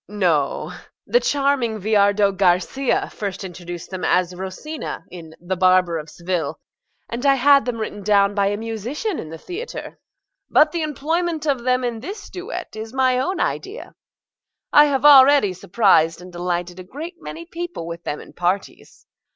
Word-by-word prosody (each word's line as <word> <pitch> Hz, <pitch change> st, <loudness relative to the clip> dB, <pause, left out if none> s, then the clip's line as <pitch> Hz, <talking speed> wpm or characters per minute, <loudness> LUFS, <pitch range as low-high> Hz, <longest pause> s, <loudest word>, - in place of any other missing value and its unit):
MRS. -, -, -71 dB
GOLD. 210 Hz, +1 st, -9 dB, 0.5 s
NO: -, -, -10 dB, 0.3 s
the 485 Hz, -, +3 dB
charming 275 Hz, -, 0 dB
Viardot 200 Hz, -1 st, +3 dB
Garcia 190 Hz, +8 st, +1 dB
first 200 Hz, -2 st, -5 dB
introduced 175 Hz, -1 st, -8 dB
them 185 Hz, -1 st, -5 dB
as 180 Hz, 0 st, +2 dB
Rosina 190 Hz, -, -6 dB
in 165 Hz, -3 st, -10 dB
"The 175 Hz, +2 st, -3 dB
Barber 185 Hz, -2 st, +3 dB
of 150 Hz, 0 st, -9 dB
Seville," 170 Hz, -3 st, -3 dB, 0.5 s
and 235 Hz, +2 st, -5 dB
I 275 Hz, -1 st, +5 dB
had 280 Hz, +1 st, +5 dB
them 245 Hz, -2 st, -2 dB
written 215 Hz, -2 st, -5 dB
down 200 Hz, 0 st, +3 dB
by 200 Hz, -1 st, +1 dB
a 205 Hz, +1 st, -1 dB
musician 230 Hz, -, -4 dB
in 155 Hz, -, -7 dB
the 165 Hz, -, -8 dB
theatre. 390 Hz, -, -7 dB, 0.5 s
But 305 Hz, 0 st, +5 dB
the 340 Hz, -, -2 dB
employment 315 Hz, +2 st, -2 dB
of 270 Hz, -5 st, 0 dB
them 255 Hz, 0 st, +2 dB
in 240 Hz, -2 st, -2 dB
this 385 Hz, -, -8 dB
duet 370 Hz, -, -7 dB
is 220 Hz, +3 st, -7 dB
my 255 Hz, -1 st, +3 dB
own 365 Hz, +8 st, -1 dB
idea. 395 Hz, +5 st, -3 dB, 0.8 s
I 295 Hz, -, +8 dB
have 275 Hz, -2 st, 0 dB
already 275 Hz, -7 st, +7 dB
surprised 175 Hz, -4 st, +2 dB
and 180 Hz, 0 st, -12 dB
delighted 175 Hz, 0 st, -3 dB
a -, -, -7 dB
great 315 Hz, -, -8 dB
many 335 Hz, +1 st, -8 dB
people 345 Hz, -, -6 dB
with 170 Hz, 0 st, -7 dB
them 150 Hz, -, -4 dB
in -, -, -13 dB
parties. 180 Hz, +3 st, -3 dB
220 Hz, 170 wpm, -21 LUFS, 185-285 Hz, 0.8 s, I